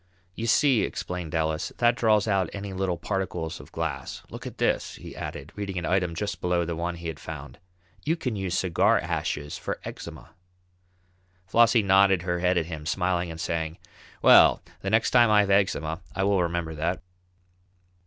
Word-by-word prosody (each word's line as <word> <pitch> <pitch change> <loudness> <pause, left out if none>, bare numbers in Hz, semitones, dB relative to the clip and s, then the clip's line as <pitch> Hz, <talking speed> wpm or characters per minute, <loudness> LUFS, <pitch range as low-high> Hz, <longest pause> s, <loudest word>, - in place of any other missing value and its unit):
"You 115 +5 -4
see," 130 0 +4
explained 90 -2 -4
Ellis, 80 -1 -1
"that 120 0 +3
draws 110 -3 +3
out 95 -4 +1
any 100 -1 -5
little 95 -2 -1
particles 85 -3 -3
of - - -13
glass. - - -4
Look - - -7
at - - -9
this," - - 0
he - - -10
added, 70 +3 -7
reading 100 -2 -4
an 85 - -2
item 90 -2 0
just 100 +3 -3
below 90 -1 +1
the 85 0 -3
one 85 +1 -3
he 85 0 -7
had 80 -2 -5
found. 75 -3 -8 0.4
"You 160 +3 +1
can 125 -9 -3
use 95 -3 -2
cigar 90 -3 +3
ashes 75 0 -3
for - - -4
eczema." - - -9 1.1
Flossie 115 +3 +4
nodded 95 -2 +4
her 90 -1 -1
head 90 0 +2
at 85 - +1
him, 80 -2 -7
smiling 90 0 0
and 80 0 -7
saying: 80 -1 -2 0.5
"Well, - - +7 0.2
the 95 - -2
next 110 +2 +2
time 120 -2 +6
I 105 -1 +6
have 100 -1 0
eczema 90 -4 +1
I 95 - 0
will 100 -1 +3
remember 85 -2 -2
that." 80 +4 -2
90 Hz, 180 wpm, -26 LUFS, 85-100 Hz, 1.1 s, Well